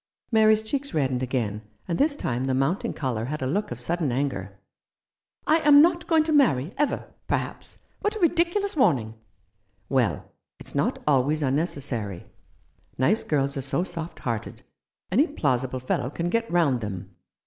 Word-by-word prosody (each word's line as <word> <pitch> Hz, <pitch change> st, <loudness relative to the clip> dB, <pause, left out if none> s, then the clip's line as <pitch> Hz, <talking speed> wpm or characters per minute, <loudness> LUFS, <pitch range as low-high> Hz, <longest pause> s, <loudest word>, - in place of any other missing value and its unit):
Mary's 220 Hz, -1 st, +5 dB
cheeks 280 Hz, +5 st, -3 dB
reddened 130 Hz, -4 st, +1 dB
again, 120 Hz, -5 st, -2 dB, 0.3 s
and 170 Hz, -2 st, -2 dB
this 290 Hz, 0 st, +3 dB
time 125 Hz, -, -2 dB
the 130 Hz, -1 st, 0 dB
mounting 135 Hz, +9 st, 0 dB
colour 120 Hz, -6 st, -2 dB
had 150 Hz, +2 st, -4 dB
a -, -, 0 dB
look 195 Hz, +11 st, -1 dB
of 120 Hz, -, -6 dB
sudden 160 Hz, +2 st, 0 dB
anger. 110 Hz, -8 st, -2 dB, 0.9 s
"I 315 Hz, -, +4 dB
am 295 Hz, -3 st, +7 dB
not 340 Hz, 0 st, +1 dB
going 320 Hz, -2 st, +4 dB
to 315 Hz, -, -2 dB
marry 185 Hz, -, +3 dB
— -, -, -29 dB
ever 295 Hz, -, -1 dB
— -, -, -44 dB
perhaps. -, -, -2 dB, 0.2 s
What 420 Hz, +1 st, -1 dB
a -, -, -4 dB
ridiculous 345 Hz, +3 st, +2 dB
warning! 140 Hz, -, +2 dB, 0.4 s
" -, -, -46 dB, 0.3 s
"Well, -, -, +1 dB, 0.3 s
it's -, -, -9 dB
not -, -, 0 dB
always 145 Hz, +2 st, +2 dB
unnecessary. 135 Hz, -, -1 dB, 0.7 s
Nice 205 Hz, -, +2 dB
girls 140 Hz, -2 st, 0 dB
are -, -, -1 dB
so 140 Hz, +6 st, 0 dB
soft 170 Hz, -2 st, -6 dB
hearted; 115 Hz, -4 st, -4 dB, 0.5 s
any 270 Hz, -, +4 dB
plausible 130 Hz, -, -1 dB
fellow 125 Hz, 0 st, -1 dB
can 170 Hz, +4 st, -3 dB
get 230 Hz, 0 st, 0 dB
round 150 Hz, -8 st, +2 dB
them. 95 Hz, -3 st, -6 dB
145 Hz, 170 wpm, -25 LUFS, -, 0.9 s, am